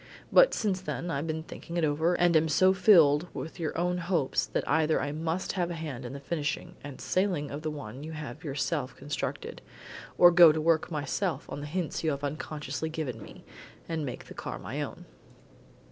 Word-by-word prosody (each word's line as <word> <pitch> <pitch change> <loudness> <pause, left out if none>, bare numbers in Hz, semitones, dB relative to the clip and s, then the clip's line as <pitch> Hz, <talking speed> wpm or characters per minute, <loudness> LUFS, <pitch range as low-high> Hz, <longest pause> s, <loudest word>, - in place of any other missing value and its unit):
But - - +6
since 195 -4 -1
then 175 -2 -4
I've 145 +1 -2
been 160 0 -3
thinking 170 +1 -7
it 170 - +1
over, 160 +4 +1
and 175 -1 +3
am 160 0 +4
so 185 +5 +5
filled 175 -5 +5
with 160 - -6
your 160 -2 -2
own 180 +1 0
hopes 170 -6 0
that - - -2
either 155 +1 +2
I 145 - -2
must 160 +4 -2
have 175 -2 -1
a 175 - -4
hand 145 -6 -6
in 120 - -6
the 140 - -6
finishing 150 0 -3
and 145 -2 -8
sailing 185 -7 0
of 145 +2 -5
the 155 - -2
one 140 -3 -7
you 160 +1 -7
have 150 0 -7
yourself 135 -3 -2
constructed, 140 +1 -5 0.6
or 175 0 +8
go 170 -2 +9
to 155 - -1
work 160 0 +2
myself 170 +4 -2
on - - -4
the 145 - -6
hints 170 +1 -3
you 160 - +2
have 140 -1 -3
unconsciously 150 0 -4
given 145 -8 -4
me, - - -12 0.4
and 165 -2 -2
make 125 -4 -6
a - - -10
car - - -5
of - - -10
my - - -4
own." - - -6
160 Hz, 205 wpm, -29 LUFS, 145-170 Hz, 0.6 s, go